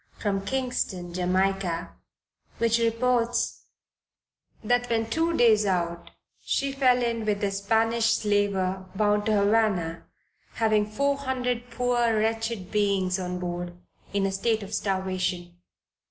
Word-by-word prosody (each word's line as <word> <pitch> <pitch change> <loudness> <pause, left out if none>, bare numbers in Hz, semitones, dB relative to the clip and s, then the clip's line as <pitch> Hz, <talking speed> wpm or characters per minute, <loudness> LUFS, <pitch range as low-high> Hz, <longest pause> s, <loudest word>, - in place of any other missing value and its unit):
from 195 -2 -1
Kingston, 200 -7 -2
Jamaica, 180 -1 0 0.7
which 230 0 +2
reports, 235 +1 0 1.0
that 245 +2 +1
when 225 -1 0
two 325 +7 0
days 220 -3 +5
out 175 -3 -1 0.3
she 275 0 0
fell 255 -2 +3
in 230 -1 -1
with 210 -1 -1
a 200 - +1
Spanish 225 +3 +2
slaver 195 -3 0
bound 210 0 +1
to - - +2
Havana, 200 -5 +1 0.5
having 215 -2 +2
four 280 +5 0
hundred 250 -3 -2
poor 240 -3 +1
wretched 225 -2 -1
beings 195 -3 +1
on 180 0 -3
board, 175 0 -5 0.3
in 200 -1 0
a 195 - 0
state 215 +3 0
of 200 +2 -9
starvation. 185 -2 -2
210 Hz, 125 wpm, -26 LUFS, 190-230 Hz, 1.0 s, days